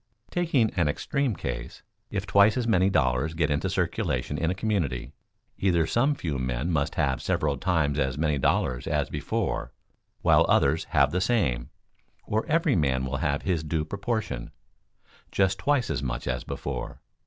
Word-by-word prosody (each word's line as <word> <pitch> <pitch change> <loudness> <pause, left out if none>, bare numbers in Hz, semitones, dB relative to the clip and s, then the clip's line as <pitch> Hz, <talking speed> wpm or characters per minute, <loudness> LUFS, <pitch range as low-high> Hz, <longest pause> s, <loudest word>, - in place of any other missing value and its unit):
Taking 155 -10 +2
an 85 -5 +1
extreme 135 - -1
case: - - -5 0.3
if - - -3
twice 100 +4 +5
as 120 -2 0
many 95 -4 +4
dollars 75 -2 +1
get 80 -2 +1
into 70 0 0
circulation 75 - -1
in 80 +2 0
a 90 - -1
community, 95 - -2 0.5
either 85 -4 +2
some 135 - +2
few 80 - -3
men 65 +6 -1
must 70 -3 0
have 65 -1 0
several 75 -2 0
times 75 -2 0
as 65 -1 0
many 75 -2 +1
dollars 65 -1 +1
as - - 0
before, 65 - -2 0.5
while - - +5
others - - +3
have 70 0 +3
the 90 +2 0
same; 75 - +1 0.5
or 110 +1 -1
every 160 -2 +2
man 65 -5 +1
will 65 +1 -2
have 70 +1 -1
his 85 -4 0
due 80 0 -1
proportion, 100 - -3 0.8
just 95 0 +1
twice 140 0 +1
as - - -1
much 60 -2 -3
as 65 -1 -1
before. - - -5
80 Hz, 165 wpm, -27 LUFS, 70-100 Hz, 0.8 s, twice